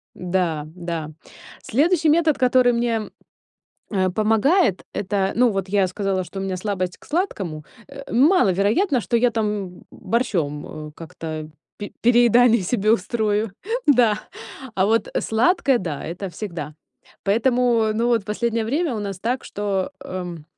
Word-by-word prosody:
Да, 175 -4 -1
да. 170 -3 -5 0.5
Следующий 320 - +2
метод, 315 -1 +3
который 250 -1 +4
мне, 235 -2 -1 0.8
э, 185 -3 +1
помогает, 220 - +2
это- 195 -1 -1
ну, 245 0 +4
вот 195 -2 -3
я 195 -1 +2
сказала, 190 0 -2
что 195 +2 -7
у - - -3
меня 190 -1 -2
слабость 185 -2 -3
к - - -19
сладкому, 195 - -2 0.2
э, 275 0 -10
маловероятно, 250 - +3
что 235 - 0
я 245 +1 +3
там 210 -5 -3
борщом, 155 - -2
э, 150 - -14
как-то 160 -2 -7 0.3
пере 205 - -7
переедание 240 -1 +5
себе 210 +2 0
устрою 215 0 0 0.3
Да, 240 -7 +4 0.6
а 190 - +2
вот, 225 +2 +1
э, - - 0
сладкое, 265 +3 +2
да, 165 -8 -5
это 180 +4 -5
всегда. 170 -5 -6 0.5
Поэтому, 235 +1 +2
ну, 230 +2 +1
вот 230 -4 +2
последнее 225 +2 -1
время 285 +4 -1
у - - -3
нас 200 -2 -5
так, 245 +5 -2
что, 200 -2 -2
эм 175 -4 -6
210 Hz, 145 wpm, -22 LUFS, 185-240 Hz, 0.8 s, переедание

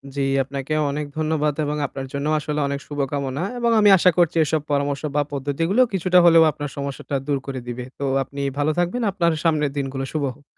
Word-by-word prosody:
জী, 140 - -1 0.2
আপনাকে 140 +2 -5 0.2
অনেক 150 +1 -3
ধন্যবাদ 155 -1 0
এবং 150 +1 -2
আপনার 135 -1 -7
জন্য 140 0 -3
আসলে 150 0 -3
অনেক 140 0 -3
শুভকামনা। 140 0 -2 0.2
এবং 235 -1 +2
আমি 210 -1 +6
আশা 180 +1 +5
করছি 170 -1 +3
এসব 155 0 0
পরামর্শ 140 -1 0
বা 145 - +3
পদ্ধতিগুলো 155 - 0
কিছুটা 185 -1 +3
হলেও 165 -1 +7
আপনার 145 -1 -6
সমস্যাটা 140 0 -4
দূর 145 -1 +1
করে 135 -1 -4
দিবে। 125 +1 -5 0.2
তো 140 - -3 0.2
আপনি 140 +2 -7 0.2
ভালো 145 +1 +1
থাকবেন। 175 +8 0
আপনার 170 -3 +1
সামনের 150 -4 +1
দিনগুলো 135 -1 -3
শুভ 155 -2 -1
হোক। 145 - -22
145 Hz, 195 wpm, -22 LUFS, 140-165 Hz, 0.2 s, হলেও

